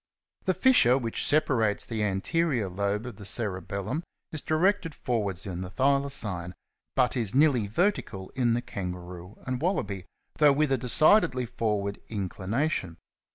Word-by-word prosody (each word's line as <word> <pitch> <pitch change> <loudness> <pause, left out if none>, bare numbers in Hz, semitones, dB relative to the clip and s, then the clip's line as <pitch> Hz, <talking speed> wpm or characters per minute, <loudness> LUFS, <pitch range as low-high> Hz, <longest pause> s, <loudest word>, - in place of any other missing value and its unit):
The 185 - +1
fissure 185 - +5
which 115 -4 -2
separates 115 -8 +2
the 110 -2 -3
anterior 115 - 0
lobe 100 +4 -2
of 125 -5 -8
the 105 - -10
cerebellum 100 - -2 0.3
is 155 - -3
directed 165 +1 +1
forwards 100 -6 -2
in 90 -2 -5
the 90 - -5
Thylacine 130 -8 0
^ - - -10 0.4
but 130 -1 +2
is 115 -2 -1
nearly 135 -7 +4
vertical 110 - -1
in 120 -3 +1
the 120 - -2
Kangaroo 90 -2 -7
and 130 0 -3
Wallaby, 100 - -2 0.3
though 150 -2 +6
with 150 0 +1
a 135 - +3
decidedly 125 - +5
forward 105 -3 -2
inclination. 100 - -2
115 Hz, 145 wpm, -27 LUFS, 100-140 Hz, 0.4 s, though